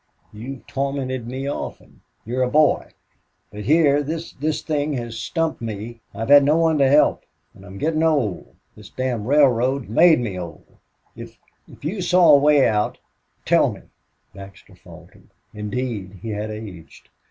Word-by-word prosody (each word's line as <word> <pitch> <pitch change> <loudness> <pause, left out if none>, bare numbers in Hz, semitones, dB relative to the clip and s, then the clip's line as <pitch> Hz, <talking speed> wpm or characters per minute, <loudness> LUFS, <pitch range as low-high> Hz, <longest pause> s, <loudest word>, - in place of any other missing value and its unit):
You've 125 +5 -9
tormented 135 -3 -3
me 130 +3 -5
often. 145 - -7 0.2
You're 125 +3 -2
a 125 - +1
boy... 150 +2 +2 0.6
But 105 0 -8
here 145 0 +4
this 160 +3 -5
this 155 +3 -3
thing 150 -1 -1
has 120 -3 -5
stumped 165 +5 -2
me. 115 +1 -6
I've 115 +3 -5
had 145 0 +8
no 150 +3 +3
one 165 -2 +2
to 135 -1 +4
help... 145 +2 +3 0.3
and 100 - -17
I'm 100 0 -11
getting 155 +6 -1
old 145 - -1 0.2
this 105 -1 -14
damned 125 -4 -3
railroad 135 -2 +3
has 110 - -13
made 160 +6 +5
me 105 -7 -4
old. 85 -2 -9 0.5
If - - -11 0.3
if - - -15
you 190 +5 -3
saw 175 -2 +5
a 140 - +7
way 145 -1 +4
out 105 -1 -1 0.5
tell - - +3
me - - -11 0.3
" - - -46
Baxter 100 0 -13
faltered. - - -17 0.2
Indeed 105 -2 -5
he 115 - -5
had 105 +1 -4
aged. 105 -6 -10
130 Hz, 165 wpm, -21 LUFS, 110-150 Hz, 0.6 s, had